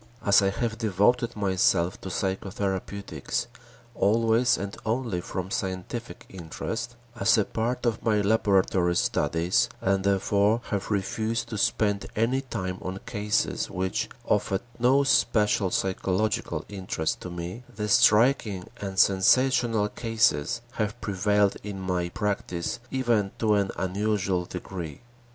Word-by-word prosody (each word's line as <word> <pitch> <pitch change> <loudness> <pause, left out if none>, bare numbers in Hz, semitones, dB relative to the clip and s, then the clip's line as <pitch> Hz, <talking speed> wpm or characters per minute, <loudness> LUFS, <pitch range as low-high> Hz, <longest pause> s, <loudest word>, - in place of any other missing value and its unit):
As 100 0 +6
I 95 - +2
have 115 +2 -3
devoted 115 +3 +2
myself 95 -3 +1
to 95 - -6
psychotherapeutics, 95 +1 -3 0.5
always 115 +4 +3
and 100 0 -5
only 115 -5 -1
from 95 +1 -5
scientific 95 +6 -4
interest, 110 +7 -5 0.2
as - - +4
a 105 - +2
part 120 +3 -2
of 115 -2 0
my 110 -2 +2
laboratory 95 -4 +2
studies 85 +1 +1
and 95 0 +1
therefore 100 +3 +2
have 100 -2 -2
refused 110 +3 -1
to 110 - -4
spend 100 0 +1
any 120 +5 +1
time 95 -8 -4
on 95 +1 -4
cases 105 +1 -1
which 95 +1 -2 0.2
offered 95 -1 +1 0.2
no 130 +4 +4
special 105 -7 +2
psychological 95 +3 -1
interest 95 -5 -3
to 90 - -6
me, 90 +7 -6
the 105 0 -3
striking 105 -3 +4
and 95 -1 -6
sensational 115 +3 +4
cases 115 -3 +1
have 110 -1 -3
prevailed 100 0 +1
in 100 -1 -6
my 90 -2 -1
practice 90 -3 -2
even 120 -7 0
to 110 -2 +2
an 100 -2 +2
unusual 95 -1 0
degree. 90 -3 -7
100 Hz, 125 wpm, -26 LUFS, 95-115 Hz, 0.5 s, As